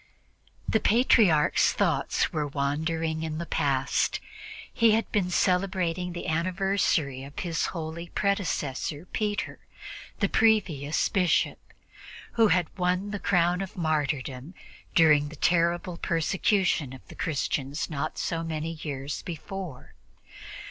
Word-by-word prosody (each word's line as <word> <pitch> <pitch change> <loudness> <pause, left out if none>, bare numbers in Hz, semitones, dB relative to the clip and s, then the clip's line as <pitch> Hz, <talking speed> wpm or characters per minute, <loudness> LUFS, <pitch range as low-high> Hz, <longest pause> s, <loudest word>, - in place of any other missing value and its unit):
The 220 - +2
Patriarch's 215 - +4
thoughts - - 0
were 150 -1 -1
wandering 160 +3 -1
in 160 -1 -3
the 170 - -4
past. - - 0 0.5
He 230 -2 +4
had 225 +1 0
been 195 -4 +1
celebrating 180 -1 0
the 175 - -6
anniversary 170 -5 0
of 140 +1 -12
his 165 -4 -1
holy 165 0 -5
predecessor 160 -6 -1
Peter, 205 +1 -3 0.6
the 200 - +2
previous 185 -11 +2
Bishop, 185 -4 +1 0.7
who 225 -2 +4
had 180 -3 +1
won 180 +3 0
the 205 - -3
crown 180 -1 +2
of 190 -1 -7
martyrdom 150 -2 -2 0.4
during 150 -3 +5
the 160 - -10
terrible 170 +3 +1
persecution 170 - +1
of 130 - -13
the - - -11
Christians 145 -1 -2
not 155 0 -4
so 165 -1 -2
many 160 0 -3
years 140 -1 -4
before. 175 -3 -7
170 Hz, 120 wpm, -27 LUFS, 150-190 Hz, 0.7 s, during